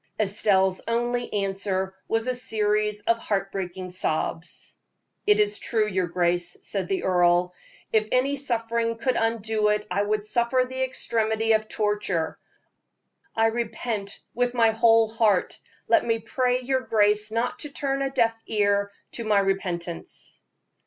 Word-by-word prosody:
Estelle's 195 -2 +2
only 240 +1 -1
answer 195 -1 -1
was 225 0 0
a 255 - 0
series 210 -3 0
of 230 +2 +1
heartbreaking 190 -3 -3
sobs. 165 -1 -3 0.5
"It 420 0 +5
is 415 0 +1
true, 220 -3 0
your 185 -3 0
grace," 175 0 0
said 195 -3 -1
the 190 - -1
earl. 180 -1 +3 0.4
"If 215 -1 +3
any 265 +3 +2
suffering 230 -3 -1
could 250 +3 0
undo 220 -1 +1
it, 210 0 0
I 195 +3 +1
would 210 0 -1
suffer 235 +3 +1
the 260 +1 -5
extremity 225 -3 0
of 215 0 +2
torture. 205 -6 -1 1.0
I 225 - +3
repent 225 -2 -2 0.2
with 245 +1 0
my 230 -2 +4
whole 225 0 +4
heart; 215 -4 +1 0.3
let - - +4
me 230 -1 +1
pray 250 +3 0
your 260 +1 0
grace 210 -2 +2
not 230 +3 -2
to 295 - -5
turn 275 -1 -2
a 275 - 0
deaf 235 -4 +1
ear 200 -1 +1 0.2
to 235 - -5
my 215 -2 +2
repentance." 180 -3 -3
215 Hz, 145 wpm, -25 LUFS, 195-235 Hz, 1.0 s, It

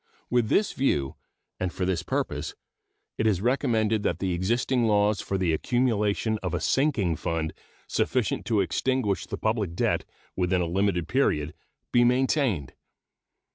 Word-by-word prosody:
With 120 -3 +2
this 210 - +2
view, 70 - 0 0.5
and 95 -1 -1
for 90 - -2
this 90 -3 0
purpose, - - -3 0.6
it 110 - +2
is 100 -5 +2
recommended 115 -2 +1
that 85 - 0
the 95 0 -1
existing 115 +6 +1
laws 105 -1 +2
for 95 - -2
the 90 -3 +1
accumulation 110 +1 +1
of - - -2
a - - -1
sinking 120 - +1
fund 80 -1 -2 0.3
sufficient 125 -5 0
to 110 -4 +3
extinguish 105 +4 0
the - - -4
public 110 -6 -1
debt - - +1 0.3
within 90 0 +1
a 90 - +1
limited 90 0 0
period 75 - +1 0.4
be 120 - +5
maintained. 125 - +1
105 Hz, 145 wpm, -26 LUFS, 90-120 Hz, 0.6 s, be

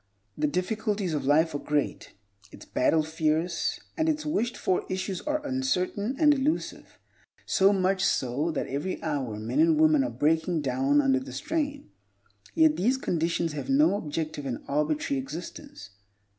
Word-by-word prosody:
The 150 - 0
difficulties 195 +2 -1
of 145 -3 -2
life 160 +2 +3
are 145 - -2
great, 145 -1 -2 0.4
its - - -12
battle 155 +5 +2
fierce, 160 +2 -1 0.2
and 320 0 +1
its 305 -1 -1
wished 240 -5 -1
for 185 - 0
issues 185 0 -3
are 300 0 -1
uncertain 260 -4 -1
and 300 -1 +5
elusive; 290 +3 -2 0.5
so 195 +1 +4
much 190 -1 +1
so, 135 +6 0
that 155 - -2
every 145 +8 -3
hour 140 -9 -2
men 115 +6 -2
and 160 -1 +4
women 155 -3 +5
are 125 - -1
breaking 160 +7 +1
down 135 +2 +2
under 135 -1 +2
the 130 - -9
strain. 290 - -3 0.6
Yet 315 -1 +4
these 245 +7 +2
conditions 170 - -1
have 150 - -5
no 275 -3 +4
objective 155 -5 -4
and 125 - -4
arbitrary 150 -1 0
existence. 135 - -9
165 Hz, 155 wpm, -27 LUFS, 145-210 Hz, 0.6 s, and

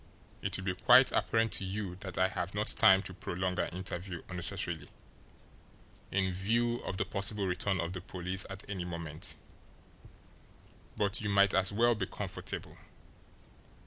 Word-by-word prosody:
"It - - -2
will - - -6
be 95 -1 0
quite 125 +8 +6
apparent 115 0 +2
to - - 0
you 95 -1 -3
that 95 -1 -8
I 95 - +4
have 90 +1 -3
not 105 +1 0
time 95 -2 +6
to 95 - -6
prolong 90 0 -3
our - - +1
interview 90 -1 -4
unnecessarily, 85 -3 -2 1.2
in 95 -1 +1
view 115 +6 +1
of 95 - -5
the - - 0
possible 100 +1 -1
return 95 +1 0
of 85 +1 -2
the 95 - -5
police 90 +1 -4
at 95 0 -6
any 95 -3 -3
moment, 85 -3 -5 1.6
but 100 +1 +1
you 105 - -2
might 100 -1 +5
as 95 0 +3
well 120 +3 +4
be 110 - -2
comfortable. - - -5
95 Hz, 155 wpm, -32 LUFS, 90-100 Hz, 1.6 s, quite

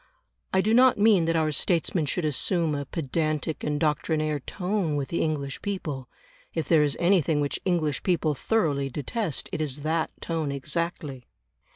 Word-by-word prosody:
I 190 - +3
do 215 +3 +1
not 255 +1 +6
mean 205 -5 +5
that 165 0 +1
our 155 -1 +2
statesmen 165 +1 +1
should 170 +4 -1
assume 160 +2 +1
a 140 -1 -3
pedantic 155 +1 -2
and 150 -1 -1
doctrinaire 155 0 0
tone 180 +1 -2
with 140 -2 -2
the 170 - -1
English 140 -3 -2
people; 155 -10 -4 0.5
if 160 - -1
there 160 -3 +5
is 145 -2 +1
anything 170 -4 +3
which 145 -1 -1
English 160 -6 0
people 170 -4 +1
thoroughly 145 -6 0
detest, 155 - -3
it - - -2
is 145 -2 -1
that 160 +1 0
tone 160 -4 -2
exactly. 145 -2 -3
155 Hz, 165 wpm, -26 LUFS, 145-175 Hz, 0.5 s, not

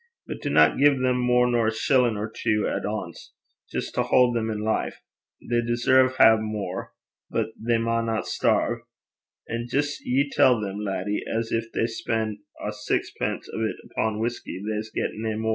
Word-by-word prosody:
But - - -7
dinna - - +4
gie 140 - +5
them 125 -1 +1
mair 125 0 +4
nor 120 -2 +2
a - - +2
shillin' 120 0 +2
or 105 +1 -2
twa 105 -2 0
at - - -3
ance 100 -5 -5 0.4
jist - - -3
to - - +1
haud 125 -1 +3
them 110 -1 0
in 105 -1 -3
life. 110 0 -1 0.5
They 120 0 +2
deserve 125 +2 +3
nae 110 0 +8
mair. 105 -4 -4 0.4
But - - -1
they 115 +1 0
maunna 115 -1 0
sterve. 115 0 +1 0.7
And 115 +1 -4
jist 145 +3 -1
ye 135 +3 +1
tell 125 -3 +5
them, 100 -1 -4
laddie, 105 0 -2
at 115 - 0
gin 115 - +1
they - - +2
spen' 110 -2 -2 0.2
ae 105 - -3
saxpence 105 0 -2
o' - - -3
't - - -4
upo' 110 -1 0
whusky, 115 -5 -3
they 110 -1 -1
s' 110 +1 -6
get - - -2
nae 110 0 -3
mair.' 110 +1 -1
115 Hz, 180 wpm, -25 LUFS, 110-120 Hz, 0.7 s, nae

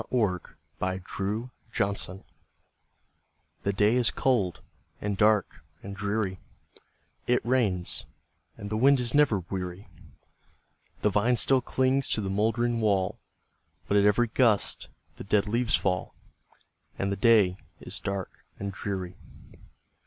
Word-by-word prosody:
THE 105 -8 +1 0.4
RAINY 95 +4 -2 0.3
DAY 100 -3 -1 1.4
The 100 - 0
day 105 +3 +3
is 120 -4 +3
cold, 105 -7 0 0.4
and 105 -1 -2
dark, 105 -7 +2 0.2
and 100 0 -7
dreary 100 -1 -2 0.9
It 125 -2 +2
rains, 110 -8 0 0.5
and 100 +1 -7
the 110 - 0
wind 135 +3 +5
is 120 -1 -2
never 145 -10 +4
weary; 90 0 -5 1.1
The 105 - +3
vine 115 +5 +3
still 130 +3 +3
clings 130 +2 +1
to 110 - 0
the 95 -1 -3
mouldering 115 +3 +1
wall, 100 -4 +1 0.7
But 100 - +1
at 100 - +4
every 110 +3 +3
gust 110 -3 +2 0.3
the - - -7
dead 100 +1 +2
leaves 115 +2 +1
fall, 90 -1 -1 0.8
And 100 0 -1
the - - 0
day 100 -3 +4 0.2
is - - -5
dark 100 -1 -5 0.2
and 100 0 -3
dreary. 95 -2 -5
105 Hz, 125 wpm, -28 LUFS, 95-115 Hz, 1.4 s, wind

